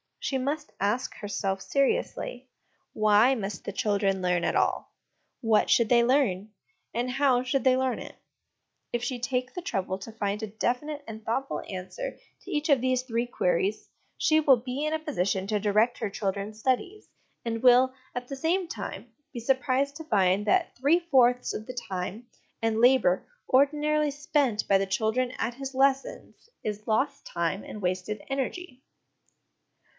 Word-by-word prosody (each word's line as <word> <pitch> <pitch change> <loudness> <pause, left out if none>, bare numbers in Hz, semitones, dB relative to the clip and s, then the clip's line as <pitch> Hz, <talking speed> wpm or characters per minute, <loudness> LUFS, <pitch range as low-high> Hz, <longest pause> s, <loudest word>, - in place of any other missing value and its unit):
She 270 - -1
must 290 +3 -3
ask 210 +6 -1
herself 195 -2 -3
seriously, 275 - -1 0.5
Why 215 +4 +4
must 200 -5 -5
the - - -3
children 200 -2 +1
learn 180 -1 +1
at - - 0
all? - - 0 0.5
What 225 -3 +3
should 235 -2 +4
they 235 -1 +5
learn? 235 -6 +1 0.4
And, 245 +2 -1
How 260 -1 +2
should 255 0 0
they 260 -1 +5
learn 260 -1 0
it? - - -9 0.8
If 240 0 -1
she 245 0 -2
take 250 +1 -2
the 360 - -5
trouble 190 - -2
to 225 - -8
find 210 -1 -2
a 220 - -3
definite 250 +8 -2
and 220 -1 -8
thoughtful 270 +4 -2
answer 190 - -5 0.3
to 385 - -9
each 305 0 -1
of 275 -4 +5
these 255 0 +1
three 235 -1 -1
queries, 425 - 0 0.3
she 310 0 +3
will 280 -4 +5
be 255 +5 -4
in 305 - -1
a 315 - 0
position 195 - -1
to 210 0 0
direct 215 +4 +2
her 220 - -2
children's 200 +1 -3
studies; 360 - -1 0.4
and 230 -1 -3
will, 255 +1 +6 0.2
at 245 0 -4
the 275 - -5
same 340 +6 0
time, 225 -2 -7 0.2
be 240 - -4
surprised 270 +3 +1
to 320 - -7
find 200 -4 +2
that 370 - +2
three 285 +7 +4
fourths 250 -7 +3
of 215 - -5
the 255 - -7
time 190 +5 -4 0.3
and 225 -1 +1
labour 245 -7 +4 0.2
ordinarily 300 +2 +3
spent 290 -6 0
by 195 - +5
the 195 0 -1
child 220 +4 0
at 250 -1 -1
his 270 0 -6
lessons 270 - 0
is 210 0 -4
lost 275 +6 0
time 170 +3 -2
and 210 - -8
wasted 185 +3 -2
energy. 270 +1 -4
245 Hz, 165 wpm, -27 LUFS, 210-275 Hz, 0.8 s, will